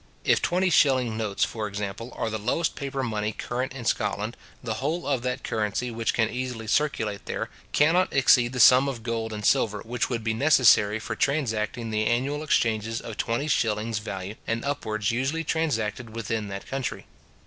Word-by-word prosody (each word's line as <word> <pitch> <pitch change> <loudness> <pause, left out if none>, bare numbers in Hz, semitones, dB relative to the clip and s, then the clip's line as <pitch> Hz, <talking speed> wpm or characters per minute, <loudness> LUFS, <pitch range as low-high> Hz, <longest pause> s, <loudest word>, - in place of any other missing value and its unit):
If - - +3
twenty 180 +1 +1
shilling 130 -7 +3
notes, 110 -3 -1
for 110 -2 -4
example, 105 +3 -5
are 115 - -1
the 110 - -3
lowest 125 +10 0
paper 135 -1 -3
money 105 -3 -1
current 125 +4 -3
in 130 -3 -8
Scotland, 110 +2 -1 0.3
the 115 -2 -2
whole 160 +6 -1
of 135 -4 0
that 125 +1 -3
currency 110 +3 -1
which 115 0 -1
can 110 -2 +3
easily 125 -1 -4
circulate 110 -5 0
there, - - -3 0.2
cannot 170 +5 +3
exceed 125 -2 +4
the 125 - -3
sum 130 +4 +7
of 120 -5 -6
gold 115 -1 -2
and 105 -1 -5
silver 105 -2 +2
which 120 +1 -2
would 115 -3 -2
be 110 0 0
necessary 110 -5 +5
for 110 - -5
transacting 115 -5 -1
the 110 0 +1
annual 135 +5 0
exchanges 115 -6 +1
of 115 - -8
twenty 120 +6 -1
shillings 110 -4 0
value 100 -2 -5
and 115 +2 -1
upwards 110 -7 -1
usually 135 +7 -1
transacted 120 -8 -2
within 110 -1 -2
that 100 0 -6
country. 135 -2 -4
115 Hz, 180 wpm, -26 LUFS, 110-135 Hz, 0.3 s, sum